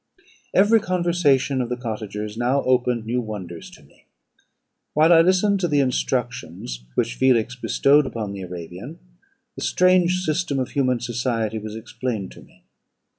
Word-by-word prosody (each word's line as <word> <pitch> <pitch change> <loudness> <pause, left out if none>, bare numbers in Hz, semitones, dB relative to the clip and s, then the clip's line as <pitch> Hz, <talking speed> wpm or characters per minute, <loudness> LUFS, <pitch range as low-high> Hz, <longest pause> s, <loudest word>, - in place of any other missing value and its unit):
"Every 210 +4 +5
conversation 170 -8 +1
of 120 - -3
the 125 - -2
cottagers 105 -3 -5
now 125 +4 +1
opened 125 -2 +1
new 120 +2 -1
wonders 95 -7 -7
to - - -17
me. - - -25 0.9
While 160 +3 +6
I 165 - +7
listened 190 +3 +3
to 180 - 0
the 145 -3 +2
instructions 120 - -2
which 115 +1 0
Felix 130 -1 +2
bestowed 140 +3 +3
upon 110 -5 -4
the 100 - -7
Arabian, 90 -1 -8 0.6
the - - -8
strange 180 0 +3
system 155 -3 -1
of 130 -2 -1
human 130 -4 0
society 115 -2 -2
was 110 0 -7
explained 110 -2 -4
to - - -13
me. - - -21
125 Hz, 150 wpm, -22 LUFS, 110-150 Hz, 0.9 s, I